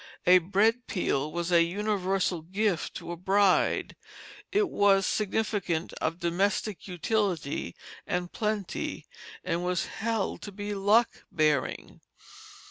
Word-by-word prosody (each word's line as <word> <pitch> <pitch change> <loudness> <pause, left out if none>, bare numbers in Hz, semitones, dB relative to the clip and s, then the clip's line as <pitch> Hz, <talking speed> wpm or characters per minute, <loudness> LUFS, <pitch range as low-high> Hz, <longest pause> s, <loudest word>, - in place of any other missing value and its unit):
A 180 +1 +8
bread 210 +7 +1
peel 155 -6 -1
was 170 +2 -3
a 170 -1 +6
universal 190 -1 0
gift 190 +1 -1
to - - -6
a - - -3
bride; 190 +2 +2 0.6
it 410 0 +2
was 200 - +3
significant 205 -5 -1
of 160 +1 -1
domestic 190 +4 -1
utility 180 - -1 0.3
and 180 0 -2
plenty, 210 -4 -3 0.4
and 170 +1 -1
was 180 -1 0
held 225 -2 -2
to 205 - -7
be 205 +1 -5
luck 205 +4 +2
bearing. 155 -3 0
190 Hz, 120 wpm, -28 LUFS, 175-210 Hz, 0.6 s, A